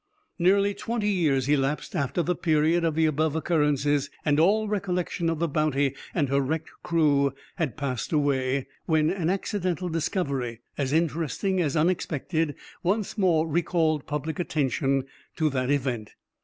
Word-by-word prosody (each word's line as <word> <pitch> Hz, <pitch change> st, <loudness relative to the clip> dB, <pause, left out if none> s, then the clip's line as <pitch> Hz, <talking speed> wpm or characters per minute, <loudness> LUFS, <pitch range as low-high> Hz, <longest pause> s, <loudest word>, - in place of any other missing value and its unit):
Nearly 200 Hz, +3 st, +4 dB
twenty 220 Hz, 0 st, -2 dB
years 145 Hz, -9 st, +1 dB
elapsed 145 Hz, +3 st, 0 dB
after 140 Hz, +2 st, 0 dB
the 180 Hz, -, +1 dB
period 160 Hz, +1 st, +2 dB
of 165 Hz, -2 st, +1 dB
the 160 Hz, 0 st, +3 dB
above 155 Hz, 0 st, +1 dB
occurrences, 145 Hz, -3 st, +1 dB, 0.2 s
and 150 Hz, -1 st, +3 dB
all 210 Hz, +6 st, +3 dB
recollection 180 Hz, -4 st, -1 dB
of 165 Hz, -, -1 dB
the 170 Hz, +2 st, 0 dB
Bounty 145 Hz, -3 st, +1 dB, 0.2 s
and 150 Hz, -5 st, +2 dB
her 140 Hz, +1 st, +2 dB
wrecked 155 Hz, +4 st, -2 dB
crew 145 Hz, -5 st, +2 dB, 0.2 s
had 160 Hz, -5 st, -2 dB
passed 135 Hz, -5 st, -3 dB
away, 140 Hz, -3 st, +1 dB, 0.2 s
when 155 Hz, -1 st, +3 dB
an 180 Hz, -3 st, -1 dB
accidental 185 Hz, -2 st, -1 dB
discovery, 140 Hz, -, -2 dB
as 140 Hz, -2 st, -1 dB
interesting 165 Hz, +4 st, 0 dB
as 155 Hz, -1 st, 0 dB
unexpected, 160 Hz, -2 st, 0 dB, 0.3 s
once 195 Hz, +3 st, 0 dB
more 170 Hz, -6 st, +2 dB
recalled 160 Hz, -2 st, +1 dB
public 150 Hz, +2 st, -3 dB
attention 135 Hz, -4 st, 0 dB, 0.3 s
to 155 Hz, -2 st, +1 dB
that 130 Hz, -1 st, -1 dB
event. 125 Hz, -6 st, -1 dB
155 Hz, 145 wpm, -26 LUFS, 140-175 Hz, 0.3 s, Nearly